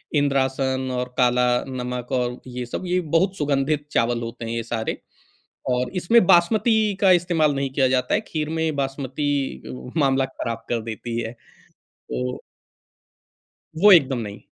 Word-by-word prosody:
इंद्रासन 135 -2 +1
और 125 0 -4
काला 125 0 +3 0.2
नमक 125 -1 -5
और 125 -1 -1
ये 125 -1 -5
सब 180 +9 -5
ये 180 +1 +1 0.2
बहुत 190 +2 +1
सुगंधित 145 +1 0
चावल 120 0 +1
होते 115 0 -6
हैं 115 - -4
ये 115 0 -2
सारे 115 -1 -3 0.7
और 125 0 0
इसमें 185 +4 +4
बासमती 215 +4 +4
का 195 -2 +5
इस्तेमाल 160 -4 +1
नहीं 135 -1 -2
किया 135 -1 +2
जाता 125 0 +1
है, - - +2
खीर 155 -1 -2
में 160 -1 -1
बासमती 135 - -2 0.4
मामला 135 -1 +3
ख़राब 115 -3 -5
कर 120 -1 0
देती 115 +1 -5
है। 115 0 -4 0.6
तो 65 0 -5 1.3
वो 200 +6 +6
एकदम 135 -6 +4
नहीं। 105 -3 -6
135 Hz, 150 wpm, -23 LUFS, 125-155 Hz, 1.3 s, वो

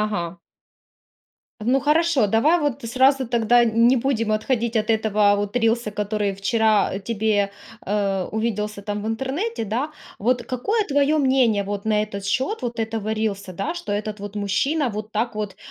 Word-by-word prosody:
Ага. 210 -4 0 1.4
Ну 255 +5 +2
хорошо, 300 -3 +3
давай 235 - +3
вот 285 -2 -2
сразу 260 +2 +3
тогда 240 0 +4
н 230 0 +3
не 260 +1 +4
будем 230 -4 0
отходить 230 +1 0
от 215 +1 -1
этого 215 -2 +3
вот 205 +3 -1
рилса, 230 -2 +1
который 205 0 -1
вчера, 215 +1 +2
э, 195 - -3
тебе, 205 -1 0 0.3
э, 195 -2 0
увиделся 210 -2 -2
там 205 0 -4
в - - -3
интернете, 265 - -2
да. 250 +9 -2 0.3
Вот 245 +3 +1
какое 400 - -1
твое 285 +1 +2
мнение, 260 -7 +3
вот 205 0 -4
на 215 -1 +2
этот 200 -2 -5
счет 260 - -1
вот 240 -1 -4
этого 220 -1 -2
рилса, 205 -3 -2
да, 195 - -3
что 345 -11 -6
этот 210 0 -3
вот 205 0 -7
мужчина 255 +9 0
вот 215 0 -6
так 220 +1 -1
вот, 210 -2 -4
220 Hz, 170 wpm, -22 LUFS, 205-255 Hz, 1.4 s, тогда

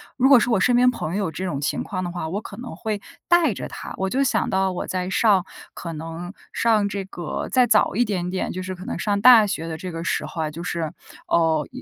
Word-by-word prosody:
如 260 +1 +3
果 275 -3 +8
是 240 - 0
我 230 - +4
身 245 +6 +3
边 250 +1 +6
朋 165 -9 -4
友 200 -1 0
有 165 - -3
这 180 - -5
种 160 -7 -2
情 145 - -1
况 185 -3 -4
的 175 - -3
话， 170 -2 -4
我 200 +5 -3
可 205 - -9
能 245 +1 -7
会 215 -3 -3 0.3
带 340 -8 +4
着 - - -6
他， - - -8
我 190 0 -1
就 270 +6 +1
想 255 - +1
到 190 0 +1
我 180 - -4
在 185 0 -2
上 195 -2 +3 0.3
可 170 - -6
能 165 +3 -6 0.2
上 215 -3 +2
这 200 -1 -3
个 175 -5 -5
再 255 -2 +4
早 220 -2 +3
一 245 +3 +3
点 180 -4 -2
点， 185 +1 -2
就 185 - -4
是 185 0 -4
可 185 +1 -10
能 - - -4
上 200 +3 0
大 230 0 +8
学 165 -5 -3
的 160 - -4
这 180 +3 -6
个 165 0 -5
时 - - -1
候 160 - -4
啊， 155 - -2
就 165 +3 -7
是， 165 -2 -3 0.3
呃， 160 -2 +2
190 Hz, 280 characters per minute, -23 LUFS, 170-220 Hz, 0.3 s, 果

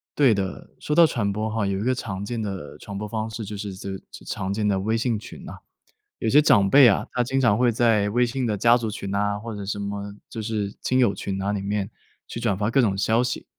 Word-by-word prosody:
对 135 -6 +5
的， 95 -1 -4
说 150 - -2
到 170 -1 +8
传 105 -9 -1
播 110 +1 -2
哈 110 -2 -1
有 100 0 -1
一 - - -3
个 130 +1 +2
常 100 -6 -5
见 115 +1 -3
的 95 -8 -6
传 100 -1 -7
播 105 - -4
方 110 +1 -3
式 110 +1 -6
就 105 0 -6
是 100 -1 -5
则 100 +1 -7 0.4
常 95 +1 -3
见 105 0 -1
的 100 -2 +2
微 110 +4 0
信 115 -2 0
群 - - -11
呐。 - - -8 0.7
有 - - -2
些 140 +7 +6
长 100 -10 +4
辈 135 -3 +8
啊， 100 - +2
他 125 - +1
经 130 +3 -1
常 120 -5 +3
会 125 -1 +4
在 110 -3 +2
微 120 +4 +2
信 125 +1 -2
的 105 -2 0
家 120 +4 +5
族 110 -2 -3
群 100 -2 -6
呐， 105 +1 0
或 115 0 -7
者 100 -1 -6
什 100 0 -3
么 100 0 -5 0.2
就 115 - -6
是 105 -2 -3
亲 130 - +1
友 120 -6 +3
群 95 -1 -4
呐 100 +1 -1
里 100 - -2
面 100 0 -2 0.4
去 115 - -6
转 110 -5 0
发 105 +2 -1
各 135 - +3
种 100 -5 +2
消 110 +4 +2
息。 125 - -3
105 Hz, 280 characters per minute, -24 LUFS, 100-120 Hz, 0.7 s, 到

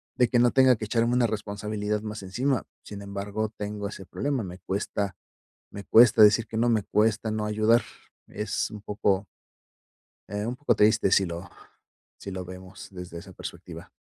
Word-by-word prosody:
de 125 - +4
que 120 - +3
no 120 0 +4
tenga 130 -1 +5
que 110 - -4
echarme 115 +2 +1
una 125 -1 +3
responsabilidad 105 0 -3
más 105 -1 -6
encima. 125 +7 -1 0.2
Sin 100 -1 -8
embargo, 100 +2 -3
tengo 105 0 -4
ese 95 -2 -9
problema. 135 +7 -2
Me 90 -1 -8
cuesta 100 0 -3 0.6
me 100 0 -8
cuesta 115 -1 +7
decir 105 +2 +6
que 110 - -7
no, 120 +1 +2
me 110 -2 +2
cuesta 110 +1 +1
no 110 0 -2
ayudar. 110 +2 +3 0.5
Es 105 0 -2
un 105 - -8
poco 100 -1 0 1.0
eh, 105 +1 -3
un 125 - -3
poco 145 -4 +1
triste 105 -2 +4
si 95 - +4
lo 85 +1 -6 0.7
si 100 - -8
lo 95 -1 -5
vemos 95 +1 -10
desde 90 -3 -8
esa 95 +2 -11
perspectiva. - - -9
105 Hz, 175 wpm, -26 LUFS, 100-115 Hz, 1.0 s, cuesta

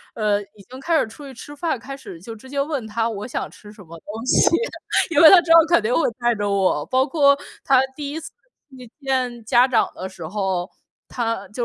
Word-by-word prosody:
呃， 210 -2 0
已 205 0 -16
经 260 +1 -10
开 330 +3 +1
始 - - 0
出 280 +6 -12
去 270 - -10
吃 290 +4 -11
饭， 315 -5 -2
开 275 +2 -8
始 170 -10 -11
就 225 +3 -9
直 260 +5 -15
接 280 0 -1
问 280 -5 -3
她 225 +2 -1
我 210 +1 -6
想 - - -4
吃 210 0 -15
什 210 -2 -14
么 165 0 -12
东 220 +6 -8
西， - - +4 0.7
因 290 - +5
为 315 - +10
她 365 -3 +8
之 330 - -3
后 330 -1 +7
肯 340 -9 +3
定 225 +4 -1
会 - - +2 0.2
带 240 -1 +1
着 205 0 -2
我。 190 -7 +1
包 260 +1 +2
括 280 -2 +3 0.3
他 265 -1 +4
第 290 -2 -5
1 320 - -5
次 - - -10 0.4
去 255 -3 -13
见 250 -3 -2
家 245 +3 +4
长 235 -4 +1
的 185 - -6
时 170 -4 -9
候， 190 -1 -2 0.4
她 230 -5 -3
就 240 +3 -4
240 Hz, 245 characters per minute, -21 LUFS, 210-275 Hz, 0.7 s, 为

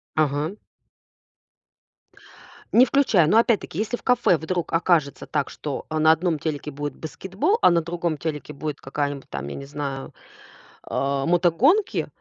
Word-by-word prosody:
Ага. 155 +5 0 2.2
Не 250 +2 +7
включай. 230 - +3
Но 215 - +4
опять-таки, 230 -7 +1
если 225 +3 -1
в - - -21
кафе 245 -9 +3
вдруг 170 +2 -3
окажется 165 -4 +1
так, 145 -3 -2
что, 145 -3 -5
а 155 0 -1
на 155 +1 +6
одном 160 0 +1
телеке 150 -1 -4
будет 145 0 -5
баскетбол, 190 - -1
а - - +7
на 170 -1 +3
другом 170 -1 -2
телеке 150 -1 -5
будет 150 0 -5
какая-нибудь 140 0 -3
там, 70 0 -5
я - - -6
не 140 - -7
знаю, 140 -2 -5 0.7
а, 135 0 -1
мотогонки, 190 - +2
160 Hz, 145 wpm, -23 LUFS, 145-185 Hz, 2.2 s, Не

